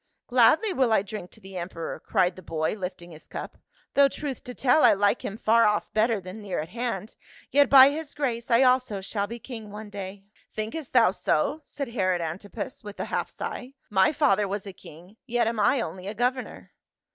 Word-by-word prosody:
" - - -56
Gladly 305 - +5
will 260 -6 +2
I 220 - +3
drink 205 -3 -7
to - - -16
the 190 -2 -10
emperor," 170 -1 -5
cried 180 -4 +1
the 185 - -11
boy 160 -2 -2
lifting 180 -3 -6
his 155 -1 -14
cup, - - -7 0.2
" - - -36
though 280 0 +6
truth 275 -1 -6
to 250 -1 -7
tell, 270 +4 +3
I - - +7
like 205 +3 +1
him 200 - -5
far 230 +1 +4
off 210 0 -1
better 220 0 +2
than 185 +3 -9
near 200 -3 -4
at 155 +1 -3
hand. 230 -2 -4 0.4
Yet 285 0 +5
by 270 0 +9
his 310 0 -6
grace 245 -5 -2
I 235 +2 +5
also 250 -6 +2
shall 200 +1 -2
be 235 - -6
king 225 -2 -9
one 210 0 -9
day." 195 0 -7 0.3
"Thinkest 225 +7 -5
thou 235 -6 +6
so?" 240 - 0
said 280 -4 -5
Herod 185 -6 0
Antipas 200 +10 -6
with 205 -1 -9
a - - -2
half - - -1
sigh. 255 +2 -6 0.2
,"My 190 +2 +4
father 210 -10 +2
was 200 +1 -4
a 195 - -7
king, 180 +5 -15
yet 240 -1 +1
am 230 0 -1
I 245 +5 +3
only 185 0 -6
a 210 - -5
governor." 250 +3 -2
215 Hz, 215 wpm, -26 LUFS, 190-250 Hz, 0.4 s, by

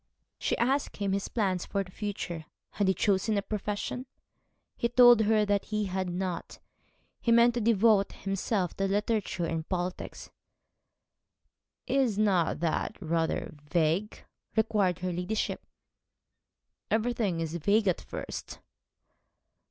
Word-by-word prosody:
She - - 0
asked 270 +4 0
him 200 -1 -1
his 195 0 -1
plans 190 -6 -1
for 200 - -1
the 185 - -15
future 180 -6 -5 0.3
had 205 - 0
he 190 - +4
chosen 205 +2 +1
a 200 - 0
profession? 210 +5 -3 0.7
He 235 - 0
told 245 -2 +7
her 215 0 +3
that 205 -1 +1
he 215 -1 -1
had 185 -1 -2
not. 180 0 -4 0.6
He 235 - +1
meant 235 +1 +6
to 240 - -1
devote 215 -2 +4
himself 195 -1 -2
to 195 - +1
literature 205 -2 0
and 165 -1 -3
politics. 180 -1 -4 1.5
'Is 255 -5 +1
not 190 -7 +2
that 170 +5 -1
rather 165 -2 -1 0.2
vague?' 170 +5 0 0.3
inquired 210 -5 +2
her 180 - -1
ladyship. 180 +5 -2 1.3
'Everything 220 -5 0
is 165 -1 -3
vague 205 +6 +2
at 180 - +1
first.' - - -7
200 Hz, 130 wpm, -29 LUFS, 180-220 Hz, 1.5 s, told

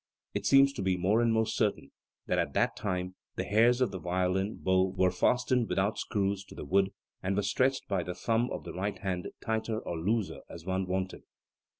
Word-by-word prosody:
It 100 0 -1
seems 135 +3 +6
to - - -4
be 95 -1 +1
more 100 +6 +3
and 115 -1 +3
more 110 0 +3
certain 110 -2 -1 0.3
that - - +1
at - - -1
that - - +2
time 90 -2 -2 0.2
the - - -1
hairs 120 +4 +4
of 125 - +2
the 95 - -5
violin 90 +3 0
bow 95 0 +1
were 90 0 +4
fastened 125 -1 +2
without 100 +3 0
screws 100 -2 -1
to - - -13
the - - -7
wood, 95 +1 +2 0.3
and 95 +1 -1
were 105 - +1
stretched 130 +7 +1
by 95 -3 0
the 90 +1 -5
thumb 115 +5 +1
of - - -5
the - - -7
right 100 +3 -2
hand 95 -3 -3
tighter 110 0 -1
or 85 -6 -5
looser 105 +4 -1
as 85 -1 -10
one 95 0 -1
wanted. 95 0 -2
100 Hz, 210 wpm, -30 LUFS, 95-110 Hz, 0.3 s, seems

